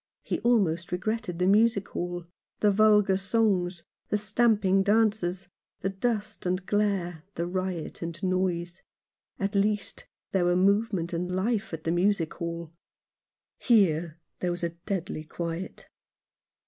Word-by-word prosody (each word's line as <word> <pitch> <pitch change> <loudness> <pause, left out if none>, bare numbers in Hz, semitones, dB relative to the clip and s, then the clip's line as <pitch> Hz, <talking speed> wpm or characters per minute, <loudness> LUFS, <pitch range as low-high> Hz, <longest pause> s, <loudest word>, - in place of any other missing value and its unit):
He - - -2
almost 180 -8 +2
regretted 185 -1 -2
the 180 - +1
music 205 +1 +3
hall, 175 -1 -4 0.3
the 210 - +4
vulgar 210 -2 +4
songs, 190 -3 +1 0.3
and 210 - +1
stamping 205 -2 +3
dances, 200 -3 +1 0.3
the 195 - 0
dust 215 -1 -2
and 185 +1 -1
glare, 195 -6 0
the 170 - -1
riot 185 -2 -3
and 170 +1 -6
noise. 180 -2 -1 0.6
At 195 +1 -2
least 205 +1 -1 0.2
there 185 -2 +2
were 175 0 +3
movement 195 -2 +2
and 175 +1 -2
life 210 +4 0
at 160 -1 -6
the 165 - 0
music 175 -1 +1
hall. 170 -1 -5 0.9
Here, 170 -8 +3 0.2
there 180 - -1
was 175 +1 -3
a 170 - +1
deadly 170 -1 -4
quiet. 170 +3 -5
185 Hz, 135 wpm, -28 LUFS, 175-210 Hz, 0.9 s, the